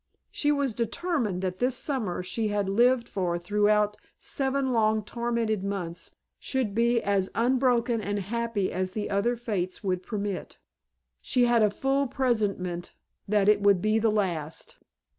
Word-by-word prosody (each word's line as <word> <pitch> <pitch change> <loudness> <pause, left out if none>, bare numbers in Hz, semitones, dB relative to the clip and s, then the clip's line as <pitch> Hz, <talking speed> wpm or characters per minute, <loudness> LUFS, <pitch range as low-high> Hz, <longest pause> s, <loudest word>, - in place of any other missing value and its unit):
She 295 - +1
was 280 -4 0
determined 235 - -1
that 185 0 -2
this 250 0 +1
summer 220 -11 -2
she 215 +5 -1
had 205 -1 0
lived 240 +4 +3
for 180 -3 -1
throughout 210 +3 +2 0.2
seven 270 -1 -1
long 215 -1 +2
tormented 235 -2 -1
months 180 -4 -4 0.2
should 255 -7 -1
be 235 +2 +3
as 195 -2 +1
unbroken 245 -1 +2
and 205 0 -2
happy 215 0 -1
as 185 0 -2
the 210 -1 -3
other 210 +5 +1
fates 205 -5 -3
would 185 -2 0
permit. 200 -1 -4 0.6
She 250 -2 +2
had 240 -1 +4
a 210 - +5
full 270 +6 0
presentiment 205 -9 -1 0.3
that 205 -1 +2
it 210 -1 +5
would 200 -2 +5
be 215 +3 +2
the 225 0 +2
last. 175 -7 -2
215 Hz, 150 wpm, -27 LUFS, 195-240 Hz, 0.6 s, a